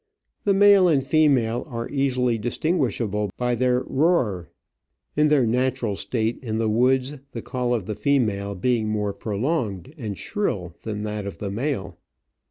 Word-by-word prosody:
The 200 -1 +3
male 200 -2 +6
and 145 -6 +3
female 130 -6 +2
are 115 -4 -4
easily 125 -4 +1
distinguishable 115 - -1
by 125 0 0
their 125 +1 +2
roar, 130 - +1 0.7
in 150 0 +4
their 145 -4 +4
natural 125 -2 0
state 110 +3 -1
in 110 -4 -3
the 115 0 +1
woods 130 +5 +2 0.2
the 115 - -5
call 125 -1 -2
of 110 -6 -3
the 105 - -3
female 105 -7 0
being 110 +2 0
more 105 -1 -1
prolonged 110 - -2
and 105 -6 -4
shrill 90 - -3
than 105 -2 -4
that 105 -1 -4
of 95 - -6
the 100 +2 -4
male. 115 - -3
120 Hz, 155 wpm, -24 LUFS, 105-135 Hz, 0.7 s, male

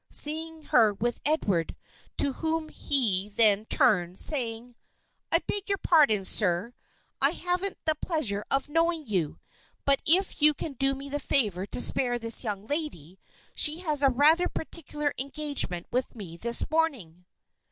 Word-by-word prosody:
seeing 320 +1 -1
her 225 -7 +3
with 235 +4 -3
Edward, 200 - -1 0.4
to 280 - +1
whom 320 +1 -3
he 210 -12 0
then 210 -1 +3
turned, 180 -6 +2
saying: 240 -4 +1 0.6
"I - - +5
beg 410 0 -5
your 395 - 0
pardon, 280 - +2
sir; 200 +4 0 0.5
I - - +5
haven't 360 +2 -1
the 315 - +4
pleasure 290 - 0
of 275 +1 0
knowing 330 +1 0
you; 180 - -2 0.5
but 275 -1 +3
if 365 +1 +2
you 300 0 +4
can 300 - -6
do 270 +1 0
me 275 +1 -9
the 290 +1 -3
favor 205 -9 0
to - - -5
spare 245 -1 +1
this 230 +1 +4
young 205 -3 -5
lady 215 - -3 0.3
she 310 +3 +4
has 305 -5 -1
a 275 - +4
rather 305 +7 +3
particular 300 -2 -5
engagement 280 - -1
with 250 0 -2
me 190 -7 -9
this 235 +7 +1
morning." 225 - -2
270 Hz, 150 wpm, -27 LUFS, 210-310 Hz, 0.6 s, I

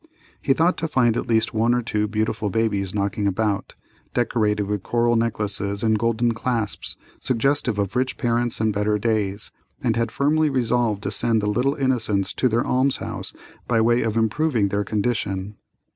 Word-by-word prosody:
He 135 - +3
thought 165 +6 +2
to 160 - -2
find 120 -6 +2
at - - -2
least 110 -1 +1
one 115 +2 +2
or 125 - -1
two 105 -1 -1
beautiful 110 0 -1
babies 100 -2 0
knocking 100 0 -1
about, 100 +1 -1 0.4
decorated 105 -4 +1
with 105 -1 -2
coral 120 +3 +1
necklaces 105 -3 -1
and 110 -1 +2
golden 115 +1 +1
clasps, 115 -2 -2 0.2
suggestive 130 -2 0
of 100 +1 -2
rich 130 +1 0
parents 120 0 0
and 110 -1 +1
better 105 +1 +1
days, 105 -2 -1 0.3
and - - +1
had 115 -1 -1
firmly 150 +5 +2
resolved 120 -5 0
to - - -2
send 115 -2 +4
the 105 - -2
little 125 +7 +1
innocents 110 -8 0
to 130 - +1
the 115 +1 +1
alms 130 +1 +1
house - - -5 0.4
by 115 -2 +2
way 120 +2 +3
of 115 0 -1
improving 115 -1 +1
their 100 +1 0
condition. 100 -2 -2
110 Hz, 175 wpm, -23 LUFS, 105-120 Hz, 0.4 s, send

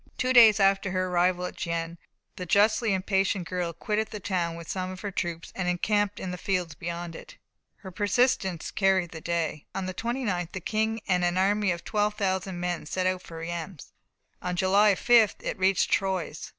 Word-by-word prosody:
Two 255 0 +1
days 225 -4 +8
after 195 0 +3
her 185 0 -1
arrival 180 0 +1
at - - -6
Gien, 170 0 -3 0.4
the 180 - -6
justly 215 +3 +3
impatient 190 -1 0
girl 180 -1 -2
quitted 210 +6 -2
the 210 - -6
town 180 -4 -2
with 170 -1 -9
some 185 -1 -3
of 185 0 -8
her 205 - -4
troops 170 -3 -4
and 185 -2 -2
encamped 205 +3 0
in 185 - -4
the 180 - -6
fields 180 -4 -1
beyond 170 +2 -6
it. - - -12 0.4
Her 190 - -11
persistence 205 -3 0
carried 190 -3 +2
the 160 - -8
day. 165 -3 -2
On 195 - -2
the 185 - -4
29th, 210 -6 -2
the 190 - -4
King 220 +4 -1
and 180 -2 +2
an 175 +1 +1
army 205 +2 +2
of 170 -1 -2
12,000 200 -3 -1
men 175 -3 -3
set 185 +3 -2
out 185 0 0
for 165 - -10
Reims. 165 0 -6 0.5
On 180 0 -2
July 195 +3 +4
5th 230 -1 +4
it - - -3
reached 190 +1 +2
Troyes. 185 -5 -1
185 Hz, 190 wpm, -27 LUFS, 175-205 Hz, 0.5 s, days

